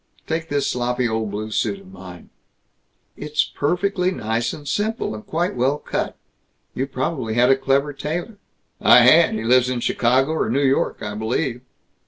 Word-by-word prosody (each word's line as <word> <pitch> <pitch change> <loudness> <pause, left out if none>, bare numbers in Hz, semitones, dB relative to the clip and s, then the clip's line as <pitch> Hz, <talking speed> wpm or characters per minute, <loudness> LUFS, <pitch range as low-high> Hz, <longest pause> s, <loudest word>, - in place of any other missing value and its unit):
Take 165 +1 -3
this 145 -1 0
sloppy 125 0 -1
old 110 -1 -2
blue 105 +2 -5
suit 195 - -1
of 190 -1 -16
mine 90 - -12 0.4
" - - -47
"It's 150 0 -1
perfectly 180 +4 0
nice 115 -8 -2
and 145 -1 -9
simple, 210 - -1
and 105 0 -8
quite 170 0 -2
well 130 +4 +1
cut. - - -4 0.6
You 135 +2 -2
probably 130 -3 -3
had 125 +2 +4
a - - +6
clever 135 +2 0
tailor." 175 +9 -5 0.4
"I - - +7
had. - - +6
He 110 - -3
lives 125 +2 +4
in 125 -1 -1
Chicago 130 +5 +1
or 160 -8 -1
New 140 +4 +1
York, 135 0 0
I 105 - -4
believe." 120 +4 -2
135 Hz, 175 wpm, -21 LUFS, 115-155 Hz, 0.6 s, I